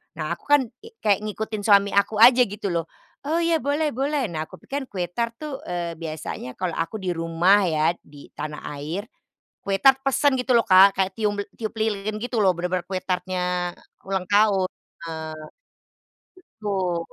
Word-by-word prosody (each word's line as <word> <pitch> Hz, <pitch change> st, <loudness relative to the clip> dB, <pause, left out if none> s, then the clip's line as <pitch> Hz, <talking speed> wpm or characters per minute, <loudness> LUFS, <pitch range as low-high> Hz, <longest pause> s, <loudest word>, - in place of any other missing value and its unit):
Nah 155 Hz, +1 st, -4 dB
aku 170 Hz, -, -5 dB
kan 290 Hz, -1 st, +6 dB, 0.2 s
kek 455 Hz, +2 st, -15 dB
kayak 205 Hz, -2 st, +3 dB
ngikutin 215 Hz, 0 st, -4 dB
suami 200 Hz, -1 st, +5 dB
aku 200 Hz, +2 st, +2 dB
aja 250 Hz, +1 st, +8 dB
gitu 200 Hz, -1 st, -4 dB
loh, 165 Hz, -1 st, -1 dB, 0.4 s
"Oh 320 Hz, -, +1 dB
iya, 330 Hz, -1 st, +2 dB
boleh 290 Hz, +3 st, 0 dB
boleh." 270 Hz, -, -1 dB
Nah, 155 Hz, -1 st, -4 dB
aku -, -, -12 dB
pikir 275 Hz, -1 st, -4 dB
kue 185 Hz, -3 st, -3 dB
tart 230 Hz, +3 st, -2 dB
tuh, 295 Hz, 0 st, -6 dB
eee, 170 Hz, -2 st, -4 dB
biasanya 155 Hz, -5 st, -6 dB
kalau 185 Hz, -2 st, -2 dB
aku 165 Hz, +6 st, -3 dB
di 180 Hz, -, 0 dB
rumah 175 Hz, +4 st, +3 dB
ya, 155 Hz, 0 st, +2 dB
di 145 Hz, -1 st, -16 dB
tanah 150 Hz, 0 st, -6 dB, 0.2 s
air, 180 Hz, -, -5 dB, 0.5 s
kue 195 Hz, -, -2 dB
tart 265 Hz, +6 st, +5 dB
pesen 275 Hz, 0 st, +2 dB
gitu 250 Hz, -1 st, +2 dB
loh, 230 Hz, -, +5 dB
Kak, 195 Hz, 0 st, +7 dB
kayak 190 Hz, 0 st, +1 dB
tium 210 Hz, -1 st, +1 dB
eee, 205 Hz, -, -5 dB
tiup 220 Hz, 0 st, -4 dB
lilin 215 Hz, -1 st, -1 dB
gitu 235 Hz, +2 st, -3 dB
loh, 190 Hz, -4 st, +4 dB
bener-bener 180 Hz, 0 st, -2 dB
kue 185 Hz, -1 st, -3 dB
tart-nya 180 Hz, -1 st, -2 dB
eee, -, -, -25 dB
ulang 190 Hz, -1 st, -1 dB
tahun 205 Hz, -3 st, +3 dB, 0.3 s
heeh, 160 Hz, -1 st, -5 dB, 1.3 s
betul, 190 Hz, -5 st, -1 dB
195 Hz, 180 wpm, -24 LUFS, 175-230 Hz, 1.3 s, aja